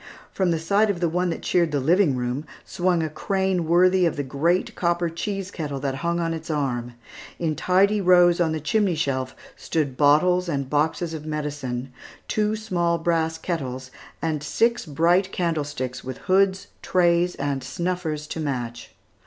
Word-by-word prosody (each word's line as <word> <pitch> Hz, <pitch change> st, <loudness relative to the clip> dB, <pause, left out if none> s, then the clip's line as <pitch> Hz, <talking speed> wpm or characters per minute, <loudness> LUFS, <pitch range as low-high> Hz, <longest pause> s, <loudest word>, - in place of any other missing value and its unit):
From 190 Hz, -2 st, 0 dB
the 165 Hz, -, +1 dB
side 200 Hz, +7 st, +2 dB
of 195 Hz, -4 st, -1 dB
the 170 Hz, -, +1 dB
one 180 Hz, +2 st, 0 dB
that 165 Hz, -, -4 dB
cheered 170 Hz, -3 st, +2 dB
the 145 Hz, -, 0 dB
living 165 Hz, +1 st, +3 dB
room, 125 Hz, +3 st, -2 dB, 0.2 s
swung 175 Hz, -2 st, 0 dB
a -, -, 0 dB
crane 190 Hz, +1 st, -1 dB
worthy 180 Hz, +1 st, +4 dB
of 165 Hz, -, -2 dB
the 145 Hz, -, -2 dB
great 155 Hz, +7 st, 0 dB
copper 170 Hz, -1 st, 0 dB
cheese 195 Hz, +2 st, -4 dB
kettle 145 Hz, -6 st, -4 dB
that 135 Hz, -1 st, -2 dB
hung 170 Hz, 0 st, 0 dB
on 165 Hz, -1 st, -1 dB
its 160 Hz, 0 st, -7 dB
arm. 125 Hz, -5 st, -2 dB, 0.4 s
In 160 Hz, -3 st, -1 dB
tidy 200 Hz, +5 st, +3 dB
rows 175 Hz, -1 st, +5 dB
on 165 Hz, -2 st, +2 dB
the 160 Hz, -, -2 dB
chimney 195 Hz, +4 st, +1 dB
shelf 130 Hz, -4 st, -2 dB, 0.2 s
stood 140 Hz, -5 st, -2 dB
bottles 175 Hz, +5 st, +4 dB
and 140 Hz, -4 st, -2 dB
boxes 160 Hz, +3 st, 0 dB
of 155 Hz, -1 st, -7 dB
medicine, 140 Hz, -4 st, -4 dB, 0.3 s
two 215 Hz, 0 st, 0 dB
small 175 Hz, -6 st, 0 dB
brass 165 Hz, -1 st, 0 dB
kettles, 130 Hz, -7 st, -4 dB, 0.3 s
and 155 Hz, -3 st, -1 dB
six 230 Hz, +8 st, 0 dB
bright 175 Hz, +6 st, +2 dB
candlesticks 145 Hz, -7 st, -2 dB
with 130 Hz, 0 st, -6 dB
hoods, 190 Hz, 0 st, +1 dB
trays, 175 Hz, -1 st, +2 dB
and 140 Hz, -1 st, -2 dB
snuffers 160 Hz, +2 st, -3 dB
to -, -, -4 dB
match. 125 Hz, -6 st, -4 dB
165 Hz, 170 wpm, -24 LUFS, 145-180 Hz, 0.4 s, rows